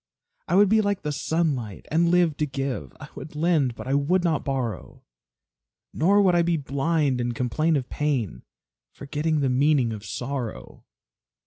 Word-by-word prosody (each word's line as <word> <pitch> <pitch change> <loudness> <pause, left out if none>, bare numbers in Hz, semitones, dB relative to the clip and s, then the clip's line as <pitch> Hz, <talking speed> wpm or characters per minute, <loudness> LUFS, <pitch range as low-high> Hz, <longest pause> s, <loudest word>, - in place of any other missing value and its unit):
I 175 - +1
would 205 +1 +6
be 220 +2 +4
like 205 -4 -1
the 150 - -2
sunlight, 145 - -2
and 170 +2 +3
live 175 -3 +3
to 150 - 0
give; 135 - -4
I - - -10
would 150 +3 -10
lend 150 -6 +1
but - - -8
I 135 - 0
would 160 +6 +2
not 160 -5 0
borrow; 125 - -4 0.9
Nor 200 +6 +3
would 185 -2 +4
I 175 - +4
be 170 0 +1
blind 140 -1 0
and 120 0 -2
complain 155 +7 0
of 130 -3 -1
pain, 120 - -2 0.5
Forgetting 150 +2 -2
the 135 - +2
meaning 130 -3 +2
of 105 -2 -8
sorrow. 125 +2 -6
145 Hz, 165 wpm, -25 LUFS, 130-165 Hz, 0.9 s, would